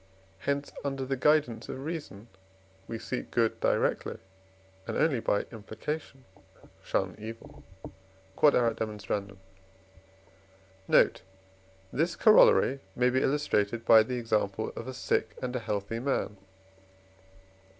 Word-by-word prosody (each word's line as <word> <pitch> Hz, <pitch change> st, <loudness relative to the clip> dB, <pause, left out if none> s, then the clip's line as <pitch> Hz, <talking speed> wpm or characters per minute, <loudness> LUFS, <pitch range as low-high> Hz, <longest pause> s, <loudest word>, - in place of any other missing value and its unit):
hence 140 Hz, +7 st, -2 dB
under 135 Hz, -2 st, -2 dB
the 135 Hz, +1 st, -1 dB
guidance 140 Hz, -4 st, +2 dB
of 135 Hz, +1 st, -6 dB
reason 150 Hz, -10 st, -6 dB, 0.6 s
we 115 Hz, -, -4 dB
seek 125 Hz, +3 st, -5 dB
good 115 Hz, -2 st, +1 dB
directly -, -, 0 dB, 0.7 s
and -, -, -2 dB
only 145 Hz, -7 st, +2 dB
by 105 Hz, -, +1 dB
implication 130 Hz, +5 st, -6 dB, 0.6 s
shun 95 Hz, -2 st, -1 dB
evil. 115 Hz, +2 st, -10 dB, 0.7 s
Q.E.D. 105 Hz, -7 st, +1 dB, 1.5 s
Note. -, -, +4 dB, 0.7 s
This 165 Hz, +7 st, 0 dB
Corollary 215 Hz, -, +6 dB, 0.2 s
may 125 Hz, +1 st, +3 dB
be 130 Hz, +1 st, +2 dB
illustrated 120 Hz, -6 st, 0 dB
by 110 Hz, -1 st, +8 dB
the 125 Hz, +4 st, -2 dB
example 110 Hz, -2 st, -1 dB
of 115 Hz, -, -7 dB
a 130 Hz, -, -5 dB
sick 110 Hz, -2 st, -1 dB
and 125 Hz, 0 st, -4 dB
a -, -, 0 dB
healthy 105 Hz, 0 st, -3 dB
man. 130 Hz, -5 st, -1 dB
120 Hz, 110 wpm, -29 LUFS, 110-135 Hz, 1.5 s, by